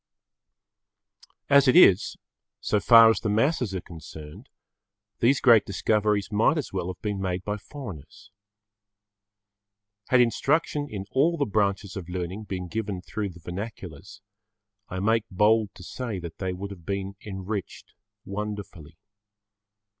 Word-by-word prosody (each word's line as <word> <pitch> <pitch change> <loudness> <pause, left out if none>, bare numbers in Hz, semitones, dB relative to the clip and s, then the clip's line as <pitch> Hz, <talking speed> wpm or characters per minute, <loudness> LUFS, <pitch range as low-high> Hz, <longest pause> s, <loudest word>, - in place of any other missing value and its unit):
As 140 -1 +5
it 130 - +5
is, 100 - +6 0.4
so 105 - 0
far 115 0 +8
as 110 - -1
the 110 - -2
masses 115 - +1
are 90 - -3
concerned, 80 - -11 0.7
those[Pg 125 +4 +4
15] - - -3
great 115 -5 +6
discoveries 105 +1 0
might 110 +10 +3
as 150 - -4
well 90 -2 -2
have 90 -1 -6
been 105 -2 -2
made 95 -1 -2
by 105 +2 -3
foreigners. 100 - -10 1.8
Had 130 - +4
instruction 145 +5 +1
in 100 -5 -6
all 160 +6 +2
the 145 - +1
branches 100 -2 -1
of 90 -3 -7
learning 90 +4 -5
been 90 -2 -5
given 100 -2 -4
through 105 0 -4
the 90 -1 -13
vernaculars, 90 -2 -8 0.7
I 95 - -4
make 110 +3 +1
bold 105 +2 +2
to - - -12
say 115 +2 -5
that 85 -3 -8
they 95 -1 -2
would 95 +2 -6
have 90 -4 -11
been 100 +1 -4
enriched 100 0 -6 0.3
wonderfully. 100 -6 -6
100 Hz, 140 wpm, -26 LUFS, 95-115 Hz, 1.8 s, far